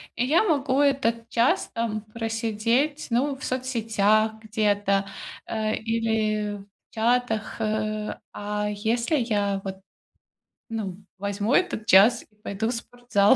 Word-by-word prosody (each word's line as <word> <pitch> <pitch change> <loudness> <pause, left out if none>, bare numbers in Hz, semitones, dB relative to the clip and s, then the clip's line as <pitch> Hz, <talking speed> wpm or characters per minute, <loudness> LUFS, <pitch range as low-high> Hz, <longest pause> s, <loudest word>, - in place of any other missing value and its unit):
и 245 - +1
я 310 +9 +4
могу 285 -8 +1
этот 245 -5 +2
час 235 +1 +2
там 225 -2 -2
просидеть, 230 +5 0
ну, 265 +4 +1
в 270 - -12
соцсетях 220 -4 +1
где-то, 205 -2 +1 0.4
а, 215 -1 -1
или 220 -2 0
в 195 - -13 0.3
чатах, 225 -1 +1
э, 215 -1 -1 0.2
а 210 0 -2
если 230 +7 0
я, 205 -5 0
вот, 190 0 -4 0.9
ну 210 -5 -4 0.2
возьму 205 +4 -1
этот 360 -12 +1
час 225 +4 +6
и 210 - -32
пойду 210 +1 -3
в - - -1
спортзал, 235 -2 +2
220 Hz, 125 wpm, -25 LUFS, 210-240 Hz, 0.9 s, час